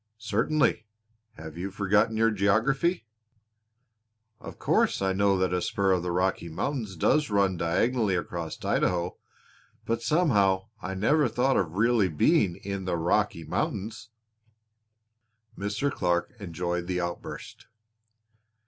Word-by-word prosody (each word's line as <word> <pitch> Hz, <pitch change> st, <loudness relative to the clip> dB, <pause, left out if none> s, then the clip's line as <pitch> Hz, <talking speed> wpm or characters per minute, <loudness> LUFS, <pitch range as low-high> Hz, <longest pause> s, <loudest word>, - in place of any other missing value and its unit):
"Certainly. 110 Hz, +3 st, 0 dB, 0.5 s
Have 80 Hz, -1 st, -10 dB
you 95 Hz, +2 st, -3 dB
forgotten 105 Hz, +3 st, +1 dB
your 115 Hz, 0 st, +3 dB
geography?" 115 Hz, -, +1 dB, 1.3 s
"Of -, -, -10 dB
course -, -, +1 dB
I 95 Hz, -1 st, 0 dB
know 100 Hz, 0 st, +2 dB
that 95 Hz, -1 st, 0 dB
a 90 Hz, -, 0 dB
spur 95 Hz, +2 st, 0 dB
of 90 Hz, -2 st, +2 dB
the 90 Hz, -, -3 dB
Rocky 90 Hz, -1 st, 0 dB
Mountains 110 Hz, -, -3 dB
does 150 Hz, -, +2 dB
run 100 Hz, -2 st, +2 dB
diagonally 100 Hz, +5 st, +1 dB
across 85 Hz, -2 st, -5 dB
Idaho; 90 Hz, 0 st, 0 dB, 0.7 s
but 115 Hz, 0 st, -1 dB
somehow 110 Hz, -, +2 dB
I 95 Hz, +1 st, -4 dB
never 140 Hz, +9 st, +3 dB
thought 130 Hz, +3 st, +1 dB
of 85 Hz, -4 st, 0 dB
really 110 Hz, 0 st, +3 dB
being 90 Hz, -, +2 dB
in 100 Hz, 0 st, -5 dB
the 90 Hz, -2 st, -1 dB
Rocky 85 Hz, +1 st, 0 dB
Mountains!" 110 Hz, +2 st, -3 dB, 1.5 s
Mr. 105 Hz, +8 st, -2 dB
Clark 90 Hz, +1 st, -1 dB
enjoyed 90 Hz, -2 st, -3 dB
the 90 Hz, -1 st, -1 dB
outburst. 85 Hz, 0 st, -6 dB
100 Hz, 125 wpm, -27 LUFS, 90-115 Hz, 1.5 s, your